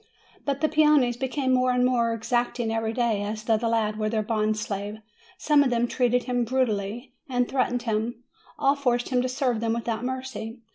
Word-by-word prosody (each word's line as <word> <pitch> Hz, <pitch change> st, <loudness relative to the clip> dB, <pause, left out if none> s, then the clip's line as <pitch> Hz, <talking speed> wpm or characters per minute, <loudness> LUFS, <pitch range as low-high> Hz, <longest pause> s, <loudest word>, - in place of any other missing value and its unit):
But 280 Hz, 0 st, -1 dB
the 310 Hz, -, +4 dB
peones 300 Hz, -6 st, +4 dB
became 265 Hz, 0 st, 0 dB
more 255 Hz, 0 st, +3 dB
and 250 Hz, 0 st, +3 dB
more 235 Hz, -2 st, +2 dB
exacting 240 Hz, 0 st, -1 dB
every 225 Hz, 0 st, -1 dB
day, 230 Hz, -3 st, 0 dB
as 215 Hz, +1 st, -4 dB
though 225 Hz, -1 st, +2 dB
the 230 Hz, +2 st, -1 dB
lad 215 Hz, -2 st, 0 dB
were 215 Hz, 0 st, 0 dB
their 215 Hz, -1 st, 0 dB
bond 215 Hz, 0 st, 0 dB
slave; 205 Hz, 0 st, -4 dB, 0.4 s
some 300 Hz, -4 st, +4 dB
of 270 Hz, -, +1 dB
them 240 Hz, 0 st, +1 dB
treated 245 Hz, 0 st, +1 dB
him 245 Hz, 0 st, 0 dB
brutally, 235 Hz, -1 st, -1 dB, 0.2 s
and 245 Hz, -1 st, +1 dB
threatened 245 Hz, -2 st, 0 dB
him; 230 Hz, +1 st, -2 dB, 0.3 s
all 275 Hz, +1 st, +3 dB
forced 245 Hz, -4 st, 0 dB
him 250 Hz, -1 st, +2 dB
to 255 Hz, -, -1 dB
serve 250 Hz, -3 st, 0 dB
them 225 Hz, 0 st, 0 dB
without 230 Hz, -1 st, -2 dB
mercy. 255 Hz, -3 st, -5 dB
240 Hz, 195 wpm, -26 LUFS, 225-255 Hz, 0.4 s, the